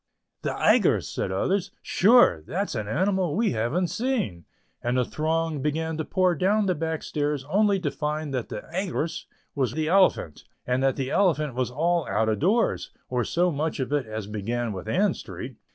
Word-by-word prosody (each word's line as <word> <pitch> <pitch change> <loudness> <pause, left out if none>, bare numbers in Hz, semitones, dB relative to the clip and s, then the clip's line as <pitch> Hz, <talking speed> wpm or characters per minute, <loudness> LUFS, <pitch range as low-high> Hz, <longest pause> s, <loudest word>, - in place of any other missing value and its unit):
"The - - -2
Aigress," - - +3
said - - -2
others, 185 - 0
"sure: 205 - +5
that's 195 +4 -2
an 110 -3 -3
animal 185 - 0
we 225 +2 +2
haven't 130 +11 0
seen," 220 - -2 0.4
and 120 +2 0
the 125 - +2
throng 160 0 -1
began 160 +3 -1
to 160 - -1
pour 185 +2 +2
down 200 +5 +2
the 185 - +2
back 160 -1 -3
stairs 145 -2 -2
only 200 +3 +3
to 150 -5 -1
find 150 0 -3
that 125 -3 -3
the - - -5
"Aigress" 175 -3 -2 0.3
was 130 -5 0
the 155 +1 -1
elephant, 185 - +2 0.2
and 125 +1 0
that 135 -1 +2
the 135 -1 -3
elephant 155 -8 +2
was 125 0 -1
all 165 +5 0
out 110 +3 +1
o' 110 - +2
doors, 205 - +1 0.2
or 125 -1 0
so 175 +8 +1
much 155 +1 -2
of 130 +2 -2
it 140 -5 0
as 110 -1 -5
began 110 +3 -3
with 95 - -7
Ann - - +2
Street. - - -8
155 Hz, 185 wpm, -26 LUFS, 125-180 Hz, 0.4 s, sure